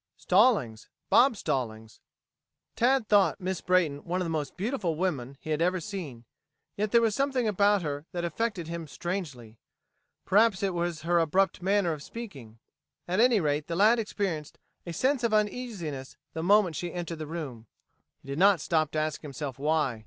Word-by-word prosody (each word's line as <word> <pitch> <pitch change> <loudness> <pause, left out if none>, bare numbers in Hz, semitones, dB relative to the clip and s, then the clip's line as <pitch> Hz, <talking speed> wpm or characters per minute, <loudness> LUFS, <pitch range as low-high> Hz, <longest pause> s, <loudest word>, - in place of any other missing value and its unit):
"Stallings 180 - +2 0.2
Bob 245 -2 +5
Stallings." 110 - -3 0.8
Tad 250 -1 +2
thought 205 -2 +4
Miss 185 -2 -3
Brayton 170 -6 +2
one 180 +1 -2
of 180 - -1
the 165 - -3
most 150 -3 -3
beautiful 195 - -1
women 140 -7 -2
he 155 - -6
had 155 +1 0
ever 180 +2 +2
seen. 155 - -7 0.5
Yet 210 +1 -1
there 235 -1 +5
was 225 -2 +2
something 265 -1 0
about 205 -1 +3
her 145 +1 -4
that 175 -2 -3
affected 185 -2 -2
him 165 -1 -5
strangely. 145 - -5 0.7
Perhaps 205 0 +3
it 195 -2 0
was 170 -2 -2
her 170 +1 +2
abrupt 185 +3 +1
manner 190 -2 +2
of 150 - -7
speaking. 140 - -9 0.5
At 185 +3 0
any 240 -2 +5
rate 150 -3 -1
the 170 - -3
lad 215 +6 +5
experienced 190 -8 -3 0.3
a - - -3
sense 260 - +1
of 225 -2 +2
uneasiness 205 - -3 0.2
the 160 - -3
moment 190 -1 +4
she 175 +2 -4
entered 170 -2 -5
the 155 - -5
room. 140 -9 -6 0.6
He - - -17
did 140 +2 -4
not 195 -1 +5
stop 155 -1 +1
to - - -2
ask 155 -1 -2
himself 140 -2 -6
why. 150 -5 0
175 Hz, 175 wpm, -28 LUFS, 150-205 Hz, 0.8 s, Bob